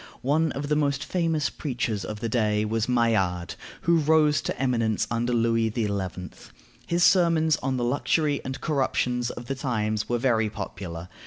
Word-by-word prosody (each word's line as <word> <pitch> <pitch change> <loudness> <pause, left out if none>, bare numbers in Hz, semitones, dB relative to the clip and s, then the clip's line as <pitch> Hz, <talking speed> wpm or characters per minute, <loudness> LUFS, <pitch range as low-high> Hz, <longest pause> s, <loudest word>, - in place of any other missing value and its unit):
One 155 +4 +2
of 145 +1 -4
the 150 - +1
most 145 -1 0
famous 165 -4 0
preachers 120 - -3
of 105 0 -6
the 115 - -1
day 105 -2 +1
was 115 +2 -1
Maillard, 105 -8 +1 0.3
who 170 0 +3
rose 155 -1 +3
to - - -4
eminence 115 -5 +1
under 120 +1 0
Louis 115 -1 +2
XI. 110 -4 0 1.0
His 175 +1 +1
sermons 165 -4 +4
on 135 -1 -2
the 120 - -1
luxury 145 +3 +1
and 130 +1 -5
corruptions 125 -5 0
of 120 - -7
the 135 - -2
times 110 -5 -2
were 120 - +1
very 115 -3 +1
popular. 90 -4 -7
125 Hz, 165 wpm, -26 LUFS, 110-150 Hz, 1.0 s, sermons